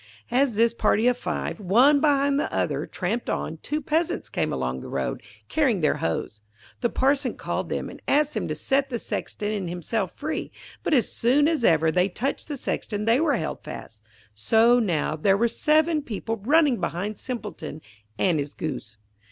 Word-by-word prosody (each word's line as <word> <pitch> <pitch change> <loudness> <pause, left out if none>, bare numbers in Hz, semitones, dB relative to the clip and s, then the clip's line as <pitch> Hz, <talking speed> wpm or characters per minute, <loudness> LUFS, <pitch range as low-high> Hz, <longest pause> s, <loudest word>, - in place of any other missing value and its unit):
As 255 -1 +2
this 230 +2 +3
party 230 -1 +2
of 250 - +4
five, 240 - -3
one 245 +10 +5
behind 285 -1 +3
the - - -2
other, - - -1
tramped 210 +6 -2
on, 160 - -2
two 300 - -3
Peasants 320 +4 -1
came - - -1
along 65 -1 -2
the - - -8
road, 65 -1 -2 0.3
carrying 260 - +1
their 150 - +2
hoes. 95 +6 -3 0.4
The 240 - +1
Parson 270 0 +1
called - - -3
them, - - -2
and - - -11
asked 300 +1 +3
them - - -2
to - - -2
set 275 0 +1
the 240 - -2
Sexton 210 -2 -3
and 195 -5 -3
himself 180 +3 -2
free. 310 +2 -4 0.3
But 315 - +1
as 240 -6 +2
soon 275 +5 +3
as 320 -6 0
ever 160 -4 +4
they 180 +3 +2
touched 260 +9 -3
the 295 -3 -4
Sexton 210 -4 -3
they 230 +3 +4
were 305 -3 +2
held 160 - -4
fast, 110 -1 -9 0.3
so 225 - +4
now 170 -8 0
there 195 +5 +3
were 235 +3 +3
seven 310 +6 +2
people 225 -3 -4
running 280 +3 +3
behind 200 +4 -3
Simpleton 210 - -6 0.4
and 175 -5 +2
his 145 0 -4
Goose. 125 -8 -5
230 Hz, 185 wpm, -25 LUFS, 175-280 Hz, 0.4 s, one